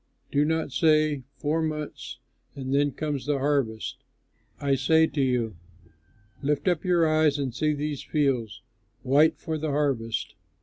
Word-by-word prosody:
Do 145 +1 +3
not 160 -1 -1
say, 155 0 +3 0.2
'Four 155 +2 0
months 155 -1 -4 0.4
and 135 -1 -4
then 145 +1 +3
comes 145 0 -4
the 145 -1 +1
harvest'; 135 -6 -1 0.6
I 140 -1 +1
say 160 +5 +4
to 145 -2 -2
you, 120 -7 0 0.8
lift 145 +4 -1
up 175 -4 +2
your 175 -3 +3
eyes 155 -2 +3
and 135 -4 -2
see 150 +4 0
these 145 -1 -3
fields 130 -8 -1 0.4
white 145 +5 +4
for 160 -1 -4
the 155 0 -2
harvest! 135 -6 -1
145 Hz, 145 wpm, -26 LUFS, 135-155 Hz, 0.8 s, say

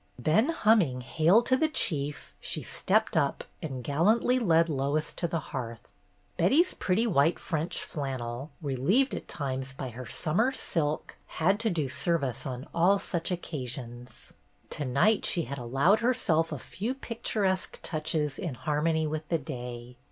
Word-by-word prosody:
Then 180 - +3
humming 210 - +3
"Hail 165 - +4
to 260 - +3
the 315 +4 +2
Chief!" 150 - -1
she - - -2
stepped - - +1
up - - +1 0.2
and 135 -5 -5
gallantly 215 - +3
led 165 -7 +4
Lois 145 +1 -1
to 170 - -2
the 165 0 -1
hearth. 115 -4 -5 0.5
Betty's 290 - +4
pretty 200 +5 +1
white 165 -6 +3
French 160 0 -2
flannel, 130 -2 -4
relieved 150 - +2
at - - -5
times 135 -2 -4
by 135 -1 -5
her 125 +1 -8
summer 220 +12 +1
silk, 155 - -2
had 190 +6 +1
to 225 0 +1
do 160 -7 0
service 140 -2 -1
CHRISTMAS 130 -3 -3
EVE - - -23
257 170 - -2
on 175 - +6
all 200 - +5
such 170 -3 -2
occasions. 125 -8 -6 0.4
To 145 - -2
night 140 - +3
she 170 - +1
had 140 -2 -5
allowed 135 - +3
herself 165 -10 +2
a 150 - -3
few 220 - -4
picturesque 210 -7 -1
touches 155 -2 -1
in 170 -9 -3
harmony 155 +3 0
with 155 0 -4
the 165 - +2
day. 125 -3 -7
155 Hz, 160 wpm, -29 LUFS, 135-190 Hz, 0.5 s, on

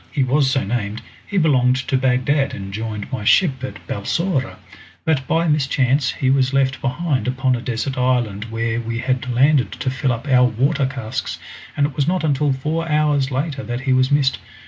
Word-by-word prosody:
"He 140 - +1
was 135 +1 +2
so 135 0 +1
named. 105 0 -3 0.2
He 205 - -3
belonged 130 -7 +3
to 130 0 -2
Bagdad, 130 +2 +1
and 95 -1 -7
joined 110 +1 -5
my 130 -6 -3
ship 130 - +3
at 130 - -7
Balsora, 135 - -2 0.5
but 135 -5 0
by 165 +1 +1
mischance 135 -2 +1
he 130 -1 0
was 135 -1 +2
left 135 -1 +1
behind 135 0 -1
upon 130 0 +1
a 120 - -5
desert 125 +3 -3
island 120 -5 0
where 115 +1 -2
we 115 0 -4
had 130 0 -1
landed 135 +2 +3
to 130 - -3
fill 130 0 0
up 120 +5 -4
our 125 -2 +5
water 135 +4 +1
casks, 130 -3 -4 0.4
and 145 - +3
it 145 -2 -4
was 140 - 0
not 180 0 0
until 145 -1 +1
four 155 +5 -2
hours 150 -3 +2
later 135 +1 -2
that 120 0 -4
he 130 -1 +1
was 130 0 +3
missed. 140 -3 +2
130 Hz, 190 wpm, -20 LUFS, 125-145 Hz, 0.5 s, our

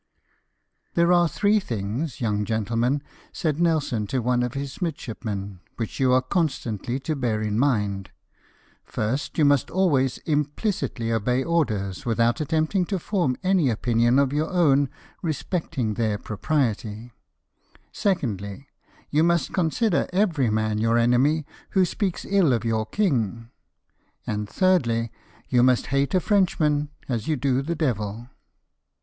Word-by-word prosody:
" - - -49
There 170 +1 +4
are 175 -1 +4
three 210 +4 +2
things, 120 - -4
young 105 -3 0
gentleman," 115 +6 0 0.3
said 155 -3 -2
Nelson 155 -11 +1
to 130 - -2
one 125 +1 +1
of 125 +1 -2
his 140 +2 -5
midshipmen, 105 - -4
" - - -43
which 115 -3 -4
you 130 -1 +3
are 130 0 +4
constantly 130 - -1
to 155 +4 -2
bear 120 -6 -1
in 105 +1 -1
mind: 105 -8 0 0.4
— - - -34
First, 120 +7 -3
you 155 - +4
must 145 -2 +3
always 145 -9 +2
implicitly 150 - -1
obey 125 +4 +1
orders, 110 - -1
without 120 +4 +1
attempting 160 +5 +1
to 195 +2 -2
form 175 -8 -1
any 185 -7 +3
opinion 120 +2 +2
of 140 -1 +2
your 150 +2 0
own 145 -7 +3 0.3
respecting 155 - -2
their 110 -2 0
propriety; 110 -1 -2 0.8
secondly, 115 - -2 0.5
you 150 - +3
must 170 0 +1
consider 180 +3 +1
every 175 - +2
man 110 0 0
your 115 +1 +2
enemy 130 +6 +3 0.3
who 185 - +6
speaks 185 0 -2
ill 190 -9 +3
of 115 -1 -1
your 110 -1 0
king; 115 - -1 0.7
and, 105 -1 -3
thirdly, 120 - +2 0.4
you 125 -2 +3
must 125 0 +3
hate 140 +6 +1
a - - +5
Frenchman 155 -7 +1 0.2
as 115 -5 -2
you 155 - +2
do 130 -1 +1
the 170 +5 -3
devil." 115 -6 -2
130 Hz, 145 wpm, -24 LUFS, 115-160 Hz, 0.8 s, who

